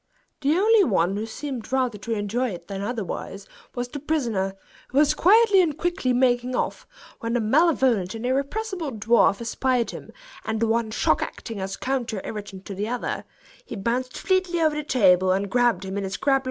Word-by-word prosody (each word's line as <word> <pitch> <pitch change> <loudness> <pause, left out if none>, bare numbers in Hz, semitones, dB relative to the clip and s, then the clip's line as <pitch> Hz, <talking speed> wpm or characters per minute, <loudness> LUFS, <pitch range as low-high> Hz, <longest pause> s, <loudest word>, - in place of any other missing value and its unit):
The 300 +3 +2
only 430 +2 +5
one 190 - +1
who 215 +2 -3
seemed 260 0 -6
rather 255 -5 0
to 205 +4 -6
enjoy 225 +4 -1
it 170 -4 -8
than 195 -1 -5
otherwise 200 -2 -4 0.3
was 245 0 -2
the 290 +4 -7
prisoner, 235 -11 -1 0.3
who 265 - -4
was 295 0 +5
quietly 410 +1 +5
and 310 -5 0
quickly 345 -7 0
making 250 0 +2
off, - - -2 0.3
when 230 0 -3
the 245 - +2
malevolent 240 - +2
and 225 +2 -5
irrepressible 305 - -2
dwarf 215 -1 +3
espied 245 +1 0
him, - - -9 0.3
and 220 0 -2
the 230 - +2
one 225 0 +1
shock 215 - +1
acting 225 -4 -5
as 190 0 -4
a - - -17
counter 250 -5 -2
irritant 205 -3 -7
to 200 - -6
the 200 +2 -3
other, 245 +1 -3 0.4
he - - -8
bounced 240 +5 -2
fleetly 370 -2 +1
over 310 -2 +2
the 300 - -2
table, 185 - +4
and 195 +1 -2
grabbed 240 -6 +2
him 190 +1 -3
in - - -3
his 190 0 -3
crab 280 - +2
like - - +6
claws. - - +3
240 Hz, 200 wpm, -24 LUFS, 205-280 Hz, 0.4 s, like